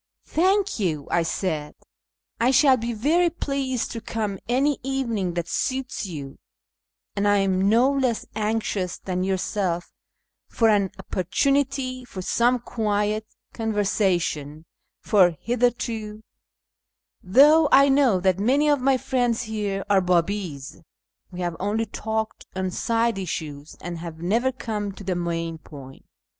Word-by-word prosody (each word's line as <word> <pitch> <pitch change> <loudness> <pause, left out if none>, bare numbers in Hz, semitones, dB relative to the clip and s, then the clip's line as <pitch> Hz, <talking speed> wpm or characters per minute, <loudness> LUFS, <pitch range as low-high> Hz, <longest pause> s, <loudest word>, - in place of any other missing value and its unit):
" - - -44
Thank 385 - +1
you," 155 -8 -1
I 175 - +3
said, 160 -3 -2 0.3
" - - -18
I 240 - +4
shall 270 +1 +6
be 235 -1 -3
very 310 +10 +2
pleased 275 -6 -2
to 230 - -5
come 215 -4 -3
any 275 +3 +2
evening 235 -9 -2
that 170 -1 -2
suits 260 0 -2
you, 140 -6 -8 0.8
and 205 0 +1
I 205 0 +4
am 195 0 +2
no 240 +5 +4
less 260 -5 0
anxious 210 -4 -1
than 185 -1 -3
yourself 185 -2 -1 0.6
for 225 -1 +2
an 200 -3 +3
opportunity 255 - 0
for 195 -6 -8
some 240 +6 +2
quiet 215 -2 -1 0.3
conversation; 190 -8 -1 0.4
for 180 -6 +4
hitherto, 230 -3 -1 1.0
though 290 - +6
I 275 +1 +7
know 270 -8 +4
that 190 0 +2
many 270 +8 +2
of 290 -3 +2
my 265 0 +3
friends 245 -2 0
here 210 -3 -3
are 195 -1 +4
Biibi's, 180 -5 -1 0.5
we 180 -1 -7
have 175 -1 -2
only 220 +3 0
talked 220 +1 -4
on 185 -1 -2
side 230 +1 0
issues, 155 -5 -5
and 175 -1 -6
have 165 -1 -7
never 225 +10 +1
come 210 -5 -4
to 200 - -11
the 185 -1 -1
main 165 -2 -3
point. 135 -3 -12
210 Hz, 140 wpm, -24 LUFS, 180-250 Hz, 1.0 s, I